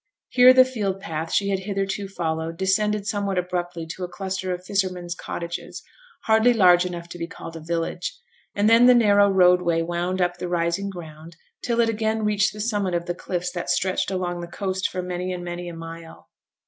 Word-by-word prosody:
Here 250 0 +7
the 255 0 +7
field 205 -7 -3
path 165 -3 -5
she 200 -1 +1
had 195 -1 0
hitherto 195 0 -3
followed 165 -3 -3
descended 205 +2 +1
somewhat 200 -2 -1
abruptly 175 -2 -3
to 175 +3 -7
a - - -2
cluster 190 0 -4
of 180 0 -5
fishermen's 185 -3 -1
cottages, 170 -1 -6 0.4
hardly 220 +2 +4
large 180 -4 +5
enough 170 -1 -7
to 175 - -9
be 170 - -3
called 165 -1 -9
a - - -6
village; 165 +2 -3 0.4
and 205 +1 +2
then 230 +2 +7
the 250 - +7
narrow 205 -3 +5
roadway 180 -3 +4
wound 175 +2 -2
up 175 -1 0
the 180 0 -5
rising 175 +3 0
ground 165 -2 -10 0.3
till 235 -1 -1
it 230 - +3
again 220 0 -1
reached 210 0 +2
the 210 - -11
summit 205 -5 -1
of 170 0 -2
the 175 - -2
cliffs 180 0 -4
that 175 - -5
stretched 185 0 0
along 180 -2 -2
the 170 - -6
coast 190 +1 -2
for 180 0 -4
many 180 0 -3
and 180 -1 -5
many 175 0 -5
a 170 - -8
mile. 165 0 -10
180 Hz, 200 wpm, -24 LUFS, 175-200 Hz, 0.4 s, Here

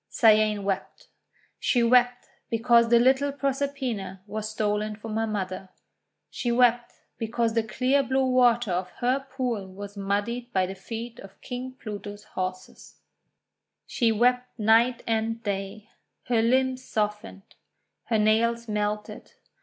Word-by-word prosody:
Cyane 215 -2 +4
wept. 195 -1 -4 0.5
She 240 -2 +2
wept 245 +1 +3 0.2
because 235 0 +4
the 235 - +6
little 265 +4 +3
Proserpina 270 -9 -3
was 215 +1 -4
stolen 215 0 -1
from 215 0 -7
her 225 0 0
mother. 190 -3 -4 0.6
She 240 - -2
wept 240 0 +3 0.3
because 230 0 0
the 230 - +2
clear 255 +5 +1
blue 265 0 +1
water 245 -4 +3
of 180 +1 -1
her 250 +3 0
pool 255 -7 -4
was 200 +2 -9
muddied 205 +5 -2
by 185 -1 +2
the 190 - -5
feet 225 +4 -7
of 195 0 -13
King 255 +1 -6
Pluto's 205 -4 -8
horses. 185 0 -6 0.9
She 230 -3 +1
wept 250 +3 +1
night 230 +3 +3
and 225 0 -1
day. 200 +1 -4 0.3
Her 235 -2 +1
limbs 260 +2 +1
softened. 210 -3 -4 0.5
Her 225 - +1
nails 230 +2 +2
melted. 210 0 -3
225 Hz, 130 wpm, -26 LUFS, 210-245 Hz, 0.9 s, the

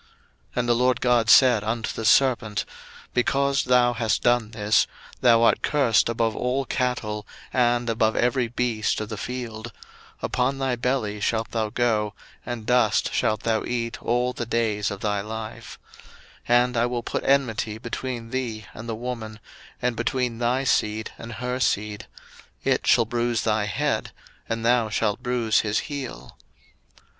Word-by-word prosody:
01:003:014 - - -30 0.5
And 120 -1 0
the - - +5
LORD 125 +1 +2
God 120 -2 +2
said 125 -6 +6
unto 110 +1 -2
the 115 - -5
serpent, 115 -2 +3 0.5
Because 140 +2 +1
thou 125 -1 +4
hast 115 -2 0
done 120 -3 +2
this, 105 -1 +2 0.3
thou 115 -2 +5
art - - +4
cursed 125 -8 +2
above 115 -1 0
all 130 +2 -1
cattle, 105 -5 -2 0.3
and 120 -1 +2
above 110 -1 +1
every 125 0 +1
beast 115 -2 -1
of 110 -1 -5
the 110 - -5
field; 120 -1 -5 0.5
upon 130 +2 0
thy 135 -2 0
belly 120 -4 -1
shalt 110 +1 -1
thou 110 -2 -1
go, 105 -3 0 0.3
and 120 -3 -5
dust 125 -3 +2
shalt 110 -1 +1
thou 110 -2 +1
eat 120 0 -3
all 125 +1 0
the 120 -1 -5
days 110 -3 0
of 100 -1 -6
thy 105 -1 0
life: 110 +1 -7 0.7
01:003:015 120 0 +6
And 125 -1 -3
I 115 - +3
will 120 -1 -3
put - - -3
enmity 115 -6 +1
between 120 0 -5
thee 115 -5 -3
and 115 +2 -8
the 115 - -2
woman, 115 -2 -6 0.4
and 125 -1 +1
between 120 0 -1
thy 125 +3 +1
seed 110 -4 0
and 115 0 -7
her 125 +2 -3
seed; 105 -4 -1 0.6
it - - +1
shall 115 - +5
bruise 120 0 -1
thy 110 -1 +1
head, 105 - -1 0.4
and 115 0 -2
thou 120 -2 +3
shalt 105 -1 0
bruise 120 -3 +1
his 105 -1 0
heel. 140 -3 -7
115 Hz, 160 wpm, -24 LUFS, 110-125 Hz, 0.7 s, said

